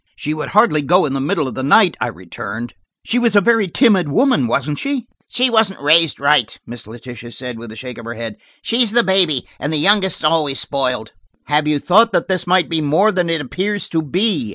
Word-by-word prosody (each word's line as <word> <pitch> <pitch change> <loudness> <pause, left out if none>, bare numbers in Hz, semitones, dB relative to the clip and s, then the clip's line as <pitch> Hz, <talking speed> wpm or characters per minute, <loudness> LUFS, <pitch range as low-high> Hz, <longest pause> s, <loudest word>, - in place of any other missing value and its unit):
"She 150 0 -4
would 155 -1 -5
hardly 210 -8 +3
go 175 +6 +2
in 135 - -3
the 135 - -2
middle 140 +1 -1
of 130 - -6
the - - -5
night," 175 +6 +4
I - - 0
returned. 95 +6 -8 0.3
"She 245 - 0
was 235 -3 +1
a - - +7
very 225 0 +2
timid 190 - +2
woman, 240 - +2
wasn't 140 +5 -2
she?" 275 -4 -3 0.2
"She 250 +1 +1
wasn't 220 -5 +1
raised 155 +2 +3
right," 140 -4 +1
Miss 120 -2 -9
Letitia 120 +1 -10
said 125 -2 -7
with 115 -1 -10
a - - -10
shake 125 +1 -8
of 115 - -11
her 115 +1 -6
head. 115 -1 -7 0.3
"She's 235 -2 +1
the 240 0 +4
baby, 185 - +2
and 145 - -3
the 155 - 0
youngest's 190 +2 +2
always 155 -3 +1
spoiled." 125 -5 -2 0.3
"Have 150 +1 0
you 150 -1 +1
thought 220 +10 +3
that - - 0
this 185 -1 -1
might 180 0 +2
be 165 -2 -1
more 160 +9 +2
than 180 -4 -1
it 165 -2 0
appears 195 +9 -3
to 160 - -1
be?" 175 +8 -1
155 Hz, 225 wpm, -17 LUFS, 130-200 Hz, 0.3 s, a